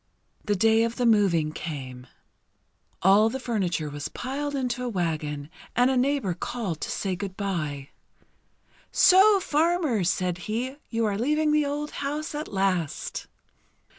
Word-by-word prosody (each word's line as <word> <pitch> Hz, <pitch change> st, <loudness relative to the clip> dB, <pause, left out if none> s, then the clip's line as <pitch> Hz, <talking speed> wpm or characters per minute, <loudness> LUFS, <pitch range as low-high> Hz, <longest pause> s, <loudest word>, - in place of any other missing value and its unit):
The 205 Hz, -, 0 dB
day 225 Hz, +3 st, +4 dB
of 230 Hz, 0 st, -1 dB
the 245 Hz, -, 0 dB
moving 190 Hz, -9 st, +3 dB
came. 130 Hz, -6 st, -7 dB, 1.0 s
All 200 Hz, +4 st, +6 dB
the 265 Hz, -, -4 dB
furniture 190 Hz, -10 st, -1 dB
was 145 Hz, 0 st, -5 dB
piled 285 Hz, +3 st, -4 dB
into 250 Hz, -2 st, -2 dB
a 250 Hz, -, -2 dB
wagon, 155 Hz, -7 st, -2 dB, 0.3 s
and 245 Hz, +2 st, +4 dB
a -, -, +1 dB
neighbour 255 Hz, -7 st, +1 dB
called 190 Hz, -2 st, -4 dB
to -, -, -3 dB
say 190 Hz, -2 st, -2 dB
good 190 Hz, +1 st, -6 dB
bye. 155 Hz, -9 st, -3 dB, 1.0 s
"So, 390 Hz, +2 st, +6 dB
farmer," 315 Hz, -, +1 dB
said 180 Hz, 0 st, 0 dB
he, 250 Hz, +5 st, -2 dB
"you 230 Hz, -1 st, 0 dB
are 205 Hz, -1 st, -1 dB
leaving 300 Hz, +5 st, +2 dB
the 300 Hz, -1 st, +2 dB
old 295 Hz, +1 st, -3 dB
house 300 Hz, +3 st, -3 dB
at 300 Hz, +1 st, -4 dB
last!" 190 Hz, -6 st, -1 dB
220 Hz, 145 wpm, -26 LUFS, 175-275 Hz, 1.0 s, All